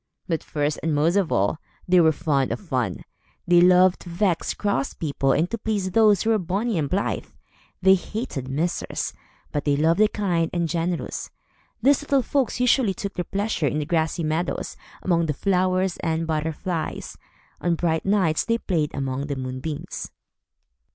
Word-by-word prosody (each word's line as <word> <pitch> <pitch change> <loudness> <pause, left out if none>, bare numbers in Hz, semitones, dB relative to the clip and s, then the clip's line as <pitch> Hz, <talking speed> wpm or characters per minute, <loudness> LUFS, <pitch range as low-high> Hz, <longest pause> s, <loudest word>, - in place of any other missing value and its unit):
But 165 -3 -1
first 145 0 -1
and 160 -2 0
most 160 +5 +2
of 195 -5 +1
all, 100 +10 +1 0.3
they 180 0 +5
were 160 -1 +5
fond 140 -3 0
of - - -2
fun. 130 - -2 0.4
They 175 0 +5
loved 180 +1 +5
to 175 - -10
vex 175 0 0
cross 200 -10 -1
people 140 -3 0
and 160 +5 +2
to 230 - -3
please 205 -4 -1
those 210 -2 +4
who 225 - +2
were 220 - +3
bonnie 195 +3 -1
and 145 -3 -1
blithe. 195 +2 -1 0.6
They 190 0 +7
hated 190 - -3
misers, 160 +6 -2 0.4
but 145 - -2
they 145 -1 +2
loved 165 +4 +2
the 215 - +6
kind 175 -7 0
and 170 -1 0
generous. 170 +1 -2 0.5
These 280 +1 +4
little 280 -3 +1
folks 265 -1 0
usually 245 -5 +3
took 200 -1 -5
their 180 - -2
pleasure 200 -5 -1
in 150 - -1
the 150 - -1
grassy 160 +1 0
meadows, 160 +3 -2 0.3
among 170 -3 +2
the 150 - 0
flowers 185 +1 +1
and 165 0 -1
butterflies. 160 +2 -3 0.5
On 175 -1 +1
bright 160 -1 0
nights 190 -6 +2
they 230 0 +1
played 165 -9 -1
among 135 +1 -2
the 140 - -2
moonbeams. 130 +3 -5
170 Hz, 170 wpm, -24 LUFS, 155-195 Hz, 0.6 s, They